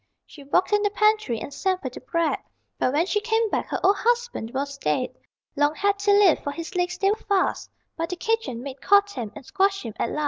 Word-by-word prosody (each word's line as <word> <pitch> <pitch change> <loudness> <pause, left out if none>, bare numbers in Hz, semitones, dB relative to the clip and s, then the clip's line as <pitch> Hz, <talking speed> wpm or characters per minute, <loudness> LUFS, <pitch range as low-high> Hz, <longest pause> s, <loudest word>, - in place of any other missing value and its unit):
She 290 - -14
walked 360 +9 +1
in 415 - +4
the 410 - +2
pantry 425 - +2
and 280 - -7
sampled 365 -9 -2
the - - -8
bread, 335 -2 0 0.4
But 255 - +2
when 305 +5 +2
she 415 +2 0
came 445 0 +1
back - - -1
her - - -2
old 395 +1 +5
husband 480 - 0
was 275 +1 -4
dead: 150 +12 -1 0.4
Long 290 +1 +2
had 405 +2 0
he 405 0 +3
lived, 405 -4 +5
for - - -2
his 330 +3 -6
legs 360 0 -1
they 390 +1 +2
were 430 - 0
fast, 400 -4 0 0.3
But 330 0 -3
the 360 - -3
kitchen 445 - -2
maid 275 -1 -8
caught 405 +1 +4
him 230 - -5
and 280 - -10
squashed 390 +5 +1
him 225 - -6
at - - 0
last. - - -3
365 Hz, 235 wpm, -24 LUFS, 285-410 Hz, 0.4 s, old